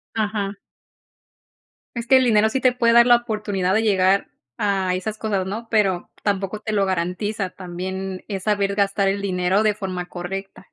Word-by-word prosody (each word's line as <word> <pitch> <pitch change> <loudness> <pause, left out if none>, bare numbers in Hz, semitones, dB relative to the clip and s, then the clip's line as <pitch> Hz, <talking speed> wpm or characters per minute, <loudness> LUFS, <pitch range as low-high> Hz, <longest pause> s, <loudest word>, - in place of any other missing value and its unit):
Ajá. 205 -2 -1 1.4
Es 235 0 -4
que 265 - +6
el 260 - +4
dinero 220 -2 +4
sí 260 +4 -1
te 255 - +5
puede 235 -1 +2
dar 235 0 +7
la 240 -1 +7
oportunidad 210 -5 -1
de 220 - +2
llegar 195 -2 +2 0.3
a 195 -3 0
esas 215 +4 -4
cosas, 200 -4 -1
¿no?, 225 +4 -5
pero 195 -5 +1
tampoco 200 0 -1
te 215 - -4
lo 200 -2 +2
garantiza. 190 +2 -2
También 185 +1 -6
es 195 -2 -4
saber 200 -2 +1
gastar 200 -1 +1
el 200 +1 -1
dinero 185 +1 +1
de 215 -1 +2
forma 185 -4 -4
correcta. 195 +2 -7
200 Hz, 175 wpm, -22 LUFS, 190-215 Hz, 1.4 s, dar